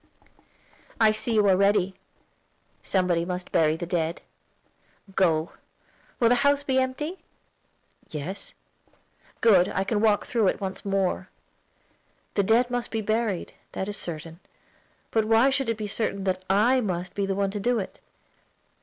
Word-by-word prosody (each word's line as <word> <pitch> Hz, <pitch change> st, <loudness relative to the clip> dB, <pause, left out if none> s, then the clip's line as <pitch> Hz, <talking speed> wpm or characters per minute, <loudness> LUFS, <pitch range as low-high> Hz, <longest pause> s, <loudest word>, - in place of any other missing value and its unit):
"I 220 Hz, -1 st, +6 dB
see 225 Hz, +2 st, -2 dB
you 210 Hz, -1 st, +4 dB
are 190 Hz, -, +5 dB
ready. 195 Hz, -1 st, +2 dB, 0.9 s
Somebody 180 Hz, -3 st, +1 dB
must 180 Hz, +1 st, -5 dB
bury 155 Hz, -1 st, +3 dB
the 175 Hz, -, -5 dB
dead. 170 Hz, -1 st, -2 dB, 0.9 s
Go. 165 Hz, -4 st, +2 dB, 0.7 s
Will 235 Hz, -, +4 dB
the 240 Hz, -, +5 dB
house 285 Hz, 0 st, +3 dB
be 265 Hz, -2 st, +1 dB
empty?" 295 Hz, +8 st, -2 dB, 0.9 s
"Yes." 160 Hz, +7 st, -6 dB, 0.9 s
"Good; 190 Hz, -6 st, +5 dB
I 190 Hz, -, -1 dB
can 205 Hz, +1 st, -1 dB
walk 210 Hz, -2 st, +3 dB
through 230 Hz, -5 st, +1 dB
it -, -, 0 dB
once 190 Hz, -1 st, -4 dB
more." 195 Hz, -2 st, -1 dB, 1.0 s
"The 200 Hz, -, +2 dB
dead 230 Hz, +5 st, +3 dB
must 245 Hz, -1 st, -2 dB
be 225 Hz, -, -2 dB
buried, 215 Hz, -3 st, -1 dB, 0.2 s
that 190 Hz, -, -3 dB
is 205 Hz, -, -4 dB
certain; 165 Hz, 0 st, -5 dB, 0.7 s
but 220 Hz, -1 st, +2 dB
why 225 Hz, +5 st, +4 dB
should 270 Hz, -3 st, -1 dB
it 230 Hz, -, -1 dB
be 215 Hz, -1 st, -4 dB
certain 200 Hz, -1 st, -2 dB
that 185 Hz, -1 st, -1 dB
I 235 Hz, +7 st, +4 dB
must 180 Hz, -2 st, -3 dB
be 200 Hz, -1 st, -1 dB
the 195 Hz, -, -1 dB
one 195 Hz, 0 st, 0 dB
to 205 Hz, -, -4 dB
do 245 Hz, +4 st, +1 dB
it?" 195 Hz, -, -5 dB
200 Hz, 155 wpm, -26 LUFS, 185-225 Hz, 1.0 s, I